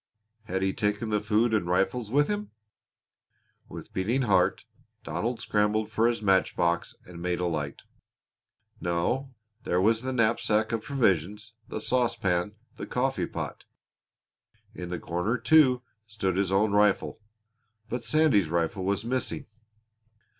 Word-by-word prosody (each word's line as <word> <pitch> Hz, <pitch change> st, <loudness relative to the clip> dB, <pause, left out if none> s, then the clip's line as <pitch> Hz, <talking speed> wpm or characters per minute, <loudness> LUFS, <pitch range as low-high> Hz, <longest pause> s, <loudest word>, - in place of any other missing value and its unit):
Had 95 Hz, -3 st, -2 dB
he 95 Hz, 0 st, +1 dB
taken 105 Hz, +2 st, -1 dB
the 105 Hz, -1 st, +1 dB
food 110 Hz, +3 st, +2 dB
and 105 Hz, -5 st, +1 dB
rifles 105 Hz, +5 st, 0 dB
with 145 Hz, +5 st, +3 dB
him? 210 Hz, 0 st, -3 dB, 1.2 s
With -, -, -10 dB
beating 115 Hz, +8 st, 0 dB
heart 95 Hz, -6 st, +2 dB, 0.4 s
Donald 110 Hz, +10 st, -2 dB
scrambled 105 Hz, +1 st, 0 dB
for 110 Hz, +1 st, +3 dB
his 115 Hz, -2 st, -1 dB
match 95 Hz, -2 st, +3 dB
box 85 Hz, -1 st, 0 dB
and 85 Hz, -1 st, -10 dB
made 90 Hz, 0 st, -1 dB
a 90 Hz, -, 0 dB
light. 75 Hz, -4 st, -3 dB, 1.0 s
No, 120 Hz, +11 st, -1 dB, 0.3 s
there 90 Hz, -, +1 dB
was 110 Hz, +4 st, +3 dB
the 130 Hz, +1 st, -3 dB
knapsack 110 Hz, -2 st, +1 dB
of 115 Hz, -1 st, -1 dB
provisions, 105 Hz, -, 0 dB
the -, -, -4 dB
saucepan, 105 Hz, -6 st, 0 dB, 0.2 s
the -, -, -6 dB
coffee 135 Hz, +2 st, -1 dB
pot! -, -, -6 dB, 1.1 s
In 90 Hz, -5 st, -7 dB
the 90 Hz, -, -3 dB
corner, 90 Hz, +9 st, -1 dB
too, 130 Hz, 0 st, +4 dB, 0.2 s
stood 100 Hz, -4 st, -2 dB
his 95 Hz, -1 st, 0 dB
own 100 Hz, +2 st, +3 dB
rifle. 105 Hz, 0 st, +2 dB, 0.7 s
But 120 Hz, +2 st, -4 dB
Sandy's 145 Hz, -, +3 dB
rifle 85 Hz, +3 st, -1 dB
was 100 Hz, +3 st, -1 dB
missing. 125 Hz, +1 st, -2 dB
105 Hz, 140 wpm, -27 LUFS, 90-120 Hz, 1.2 s, too